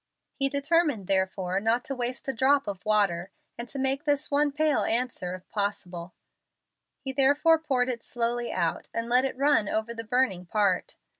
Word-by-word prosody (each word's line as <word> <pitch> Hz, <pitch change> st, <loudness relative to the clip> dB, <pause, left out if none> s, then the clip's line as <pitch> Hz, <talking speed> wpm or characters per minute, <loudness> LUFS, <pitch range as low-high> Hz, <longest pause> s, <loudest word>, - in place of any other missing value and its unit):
He 275 Hz, -1 st, 0 dB
determined 285 Hz, -, +1 dB
therefore 190 Hz, 0 st, 0 dB
not 225 Hz, +4 st, +1 dB
to 275 Hz, -, -4 dB
waste 250 Hz, +3 st, -2 dB
a 270 Hz, -, -1 dB
drop 270 Hz, +2 st, +2 dB
of 195 Hz, -3 st, -5 dB
water, 195 Hz, -4 st, +1 dB, 0.3 s
and 235 Hz, 0 st, -7 dB
to -, -, -7 dB
make 270 Hz, +1 st, +2 dB
this 290 Hz, -1 st, 0 dB
one 290 Hz, +1 st, +2 dB
pail 305 Hz, 0 st, +1 dB
answer 230 Hz, -7 st, -1 dB
if 185 Hz, -, -14 dB
possible. 185 Hz, -4 st, -3 dB, 0.9 s
He 265 Hz, -1 st, -3 dB
therefore 290 Hz, +4 st, +4 dB
poured 265 Hz, -6 st, 0 dB
it 245 Hz, -2 st, -3 dB
slowly 240 Hz, 0 st, -2 dB
out, -, -, -2 dB
and 230 Hz, 0 st, -2 dB
let 250 Hz, +2 st, +4 dB
it 265 Hz, -, -3 dB
run 275 Hz, -6 st, +2 dB
over 220 Hz, +2 st, -2 dB
the 230 Hz, -1 st, -6 dB
burning 220 Hz, -6 st, 0 dB
part. 200 Hz, -2 st, 0 dB
240 Hz, 175 wpm, -27 LUFS, 205-275 Hz, 0.9 s, therefore